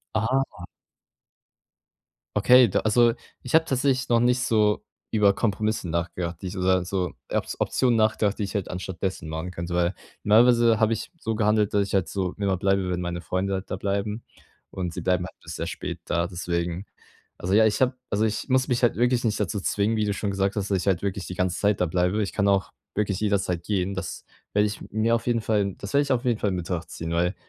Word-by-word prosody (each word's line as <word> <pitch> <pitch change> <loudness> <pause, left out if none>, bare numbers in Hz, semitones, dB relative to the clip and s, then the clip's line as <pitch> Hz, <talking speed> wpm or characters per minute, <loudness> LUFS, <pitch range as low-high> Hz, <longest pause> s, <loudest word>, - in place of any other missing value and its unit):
Ah. 115 -4 0 1.7
Okay, 125 0 +7
da 95 - +1
also, 115 +2 +4 0.3
ich 125 - -6
habe 160 0 +6
tatsächlich 130 -2 0
noch 120 -1 +4
nicht 125 +1 +3
so 105 -3 +2 0.3
über 105 -2 +4
Kompromisse 110 -3 -1
nachgedacht, 85 +1 -3
die 95 - -4
ich 90 - -6
oder 90 0 +2
so 90 -2 -2 0.2
Op - - 0
Optionen 125 -3 +2
nachgedacht, 110 -1 +1
die - - 0
ich 100 - -5
halt 100 -2 -2
anstattdessen 90 -2 -4
machen 80 +3 -4
könnte. 85 0 -4
Weil 85 +1 +2 0.3
normalerweise 115 +1 +5
habe 110 0 +3
ich 110 - -5
so 110 -1 -2
gehandelt, 105 -1 +2
dass 100 -1 +3
ich - - -8
halt 95 -3 +2
so 95 -2 -2
immer 100 -2 0
bleibe, 95 0 +1
wenn 90 0 -1
meine 85 0 -3
Freunde 95 +4 -1
halt 95 0 -4
da - - -2
bleiben. 100 +3 -2 0.5
Und 90 -3 -4
sie - - -4
bleiben 90 -1 +1
halt - - -16
bis - - -7
sehr - - -3
spät - - -5
da, 85 0 0
deswegen. 85 +1 -3 0.5
Also, 95 +2 -1
ja, 110 +1 +6
ich 105 -1 +2
habe 130 -1 +3 0.2
also, 105 +1 +1
ich 110 +5 -3
muss 130 +1 +3
mich 125 -1 0
halt 120 - +3
wirklich 120 +1 +2
nicht 110 -1 0
dazu 100 0 -1
zwingen, 105 +4 0
wie 110 - +1
du 105 - 0
schon 100 +1 -2
gesagt 100 0 0
hast, 100 0 -2
dass 95 - +3
ich 90 - -5
halt 95 -3 +2
wirklich 100 -1 -3
die 90 - -6
ganze 90 -1 -1
Zeit 105 -1 +1
da 90 - +3
bleibe. 90 +5 +1
Ich 100 - -3
kann 100 -1 +1
auch 100 -1 +2 0.2
wirklich 100 -2 -1
jederzeit 95 -5 0
gehen. 100 -1 -1
Das 95 -4 -6 0.3
werde 105 +1 +3
ich 105 - -5
mir 110 +2 +2
auf 115 0 -2
jeden 120 -1 +2
Fall 105 -3 0
das 100 +6 -7
werde 140 - +5
ich 140 -2 0
auf 125 +1 0
jeden 120 -3 +2
Fall 105 - 0
in 95 - -2
Betracht 85 -1 -4
ziehen, 80 0 -5
weil 90 +3 +1
100 Hz, 225 wpm, -25 LUFS, 90-110 Hz, 1.7 s, Okay